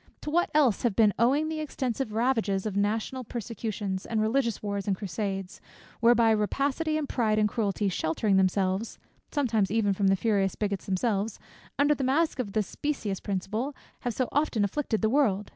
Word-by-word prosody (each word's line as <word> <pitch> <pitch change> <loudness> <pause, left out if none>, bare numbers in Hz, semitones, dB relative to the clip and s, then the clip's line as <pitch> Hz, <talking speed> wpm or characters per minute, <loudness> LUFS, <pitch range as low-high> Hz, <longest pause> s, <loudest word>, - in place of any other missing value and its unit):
To 300 - -4
what 345 +2 +2
else 270 -9 +4
have 235 -5 0
been 215 -3 +5
owing 275 +7 +3
the 315 0 -3
extensive 265 -5 -3
ravages 220 -4 +1
of 210 -3 -3
national 220 +5 -1
persecutions, 215 -4 -4
and 225 - -2
religious 230 0 0
wars 200 0 -3
and 195 -2 +1
crusades; 195 0 -4 0.4
whereby 235 -1 +5
rapacity, 275 +9 0
and 300 -2 -2
pride, 220 -5 +1
and 210 0 +3
cruelty, 210 -2 -1
sheltering 190 +3 0
themselves 190 +2 +1 0.3
(sometimes 230 -9 +1
even 205 -1 +2
from 195 0 +1
the 195 - +4
furious 195 -1 +1
bigots 200 -2 -3
themselves) 205 +2 -1 0.4
under 290 +1 +4
the 275 - -3
mask 285 +4 +1
of 205 -6 -3
this 215 -2 +1
specious 220 -10 -3
principle, 215 +8 -3 0.2
have 245 -3 -3
so 255 - 0
often 280 -7 +1
afflicted 220 +1 -1
the 220 - +4
world? 210 -8 +2
220 Hz, 175 wpm, -28 LUFS, 200-260 Hz, 0.4 s, been